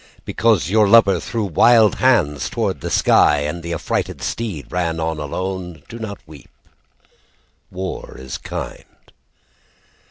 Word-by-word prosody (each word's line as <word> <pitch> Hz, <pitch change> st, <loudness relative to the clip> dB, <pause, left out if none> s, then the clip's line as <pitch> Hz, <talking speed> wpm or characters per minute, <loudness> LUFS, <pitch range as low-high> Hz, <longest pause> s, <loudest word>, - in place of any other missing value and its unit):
Because 110 Hz, -6 st, +1 dB
your 110 Hz, -1 st, +4 dB
lover 100 Hz, -4 st, +5 dB
threw 115 Hz, +4 st, -3 dB
wild 110 Hz, +4 st, +4 dB
hands 75 Hz, -, +2 dB
toward -, -, -2 dB
the -, -, -4 dB
sky 75 Hz, -1 st, +4 dB
And 75 Hz, +4 st, -3 dB
the 85 Hz, +1 st, -6 dB
affrighted 85 Hz, -, -2 dB
steed 100 Hz, -, -4 dB
ran 85 Hz, -2 st, -1 dB
on 80 Hz, -1 st, -2 dB
alone, 90 Hz, +1 st, -5 dB
Do 115 Hz, -, -9 dB
not 105 Hz, -3 st, -6 dB
weep. 75 Hz, -4 st, -14 dB, 1.2 s
War 95 Hz, 0 st, -6 dB
is 65 Hz, 0 st, -7 dB
kind. -, -, -8 dB
90 Hz, 130 wpm, -20 LUFS, 80-110 Hz, 1.2 s, lover